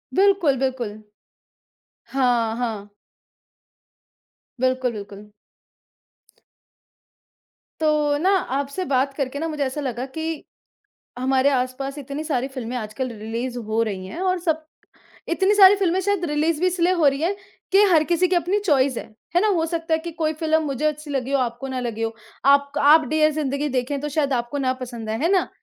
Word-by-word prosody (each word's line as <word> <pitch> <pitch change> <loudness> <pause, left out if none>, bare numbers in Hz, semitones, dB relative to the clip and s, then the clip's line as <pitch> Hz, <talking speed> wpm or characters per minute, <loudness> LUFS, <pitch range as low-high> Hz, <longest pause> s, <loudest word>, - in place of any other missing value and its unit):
बिल्कुल, 380 -8 +3
बिल्कुल। 260 -5 -1 1.2
हाँ, 240 -4 +1
हाँ। 220 -4 -3 1.7
बिल्कुल, 255 -1 +1
बिल्कुल। 205 0 -10 2.5
तो 300 -2 +2
ना 355 +6 +1 0.3
आपसे 285 +7 -3
बात 275 +1 +1
करके 275 0 -3
ना 325 - -2
मुझे 300 -2 -2
ऐसा 275 +2 -3
लगा 250 -2 -3
कि 320 +3 -5 0.8
हमारे 265 +2 +2
आस-पास 270 +2 -2
इतनी 280 +3 -5
सारी 265 -4 -1
फिल्में 255 -2 -5
आजकल 245 +3 -4
रिलीज़ 235 +3 -4
हो 220 0 -1
रही 190 -4 -3
हैं 335 - -7
और 370 -1 +1
सब 320 -2 -1 0.6
इतनी 385 +4 +2
सारी 395 -1 +8
फिल्में 375 -2 +1
शायद 395 -2 0
रिलीज़ 305 +1 0
भी 365 - +2
इसलिए 360 0 +2
हो 335 -5 +2
रही 275 +1 +2
हैं 370 +4 +1 0.4
कि 400 +1 +6
हर 315 -2 +5
किसी 350 +2 +2
की 360 - +2
अपनी 360 +4 +1
चॉइस 275 - +2
है। - - -6 0.3
है - - +6
ना? 430 - +2
हो 335 -5 +1
सकता 330 -1 -1
है - - +2
कि 340 +1 -6
कोई 315 -1 -1
फिल्म 315 0 +2
मुझे 280 0 -3
अच्छी 300 0 -3
लगी 270 -2 -2
हो 275 - +3
आपको 245 +2 -3
ना 260 -1 -3
लगी 230 -2 -4
हो। 225 0 -2 0.3
आप 280 0 +4
क - - +2
आप 305 +2 +6
डियर 310 0 +3
ज़िंदगी 290 -1 -1
देखें, 265 +1 -2
तो 295 - -3
शायद 285 -2 0
आपको 240 +3 -2
ना 260 -1 +1
पसंद 235 -3 -6
आए, 220 - -2
है 315 +7 +1
ना? 375 - +2
280 Hz, 175 wpm, -23 LUFS, 255-320 Hz, 2.5 s, सारी